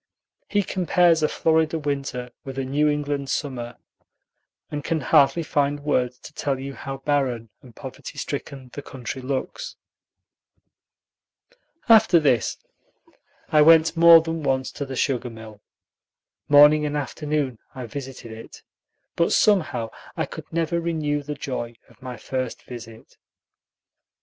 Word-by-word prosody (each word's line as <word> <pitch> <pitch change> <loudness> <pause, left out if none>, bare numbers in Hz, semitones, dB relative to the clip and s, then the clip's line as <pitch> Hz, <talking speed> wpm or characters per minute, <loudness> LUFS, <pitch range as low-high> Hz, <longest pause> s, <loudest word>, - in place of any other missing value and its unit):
He 205 -1 +2
compares 175 -3 +2
a 155 - +3
Florida 160 0 +1
winter 140 -4 -3
with 135 -1 -8
a 135 - -1
New 145 +3 +2
England 145 -2 -2
summer, 125 -5 -3 0.9
and 145 -1 -4
can 160 +1 -1
hardly 145 +3 +4
find 145 -1 0
words 125 -4 0
to 150 - -12
tell 140 -3 -2
you 135 +1 -6
how 135 0 -6
barren 135 -5 -1
and 120 -3 -16
poverty - - -9
stricken 130 -3 -6
the 145 - -6
country 130 -1 -7
looks. 140 - -4 2.1
After 220 -6 +6
this 130 -8 +1 0.9
I 150 - +5
went 160 +1 +6
more 165 0 +8
than 165 0 -3
once 130 -2 0
to 140 - -6
the 135 - -5
sugar 125 -2 0
mill. 110 -2 -12 0.9
Morning 150 +1 +7
and 150 0 -1
afternoon 145 -3 -2 0.2
I 130 -2 -6
visited 130 -1 -8
it, 110 0 -11 0.5
but 170 - +2
somehow 155 - +2 0.3
I - - 0
could - - -10
never 170 +1 0
renew 155 -3 -1
the 145 +1 -6
joy 120 -4 -5
of - - -23
my 125 -1 -7
first 130 -2 -4
visit. 115 -2 -11
140 Hz, 135 wpm, -24 LUFS, 130-155 Hz, 2.1 s, more